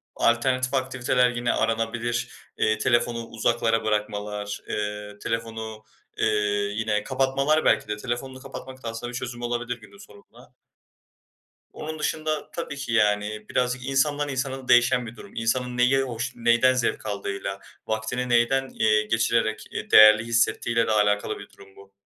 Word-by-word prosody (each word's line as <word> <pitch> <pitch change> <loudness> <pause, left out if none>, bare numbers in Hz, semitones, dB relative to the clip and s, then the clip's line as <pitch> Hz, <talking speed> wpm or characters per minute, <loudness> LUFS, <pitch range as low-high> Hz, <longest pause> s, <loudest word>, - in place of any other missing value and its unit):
alternatif 130 +2 +1
aktiviteler 125 -1 +2
yine 120 0 0
aranabilir. 115 +1 -1 0.3
Eee, 110 0 +2
telefonu 120 0 +1
uzaklara 115 0 +1
bırakmalar, 105 -1 -2
eee, 105 0 -4
telefonu, 110 -1 -4 0.3
eee, - - +1 0.5
yine 105 -1 0
kapatmalar 135 +4 +1
belki - - +3
de 105 0 -3
telefonunu 130 +3 -4
kapatmak 130 -1 -10
da 115 - -3
aslında 115 +2 -5
bir 125 - -4
çözüm 125 -2 -6
olabilir 120 0 -2
günün 100 -1 -15
sorununa. 100 0 -17 1.2
Onun 155 0 -6
dışında, 155 0 -2
tabii 165 -4 -5
ki 140 -5 -4
yani, 105 -1 +1
birazcık 125 0 -1
insandan 145 +2 +1
insana 135 -1 -3
değişen 120 0 +4
bir 115 0 -9
durum. 100 - -12
İnsanın 125 +2 -1
neyi 125 +2 +4
hoş 125 -1 -4
neyden 120 +2 +4
zevk 125 -3 -1
aldığıyla, 100 -1 -4 0.3
vaktini 110 +3 -2
neyden, 125 +3 +2
eee, 105 -1 +2
geçirerek, 110 0 0
eee, - - -6
değerli 110 0 +9
hissettiğiyle 115 0 +1
de - - +1
alakalı 105 -1 +1
bir - - -10
durum 95 -1 -18
bu. 100 0 -16
120 Hz, 145 wpm, -25 LUFS, 110-130 Hz, 1.2 s, değerli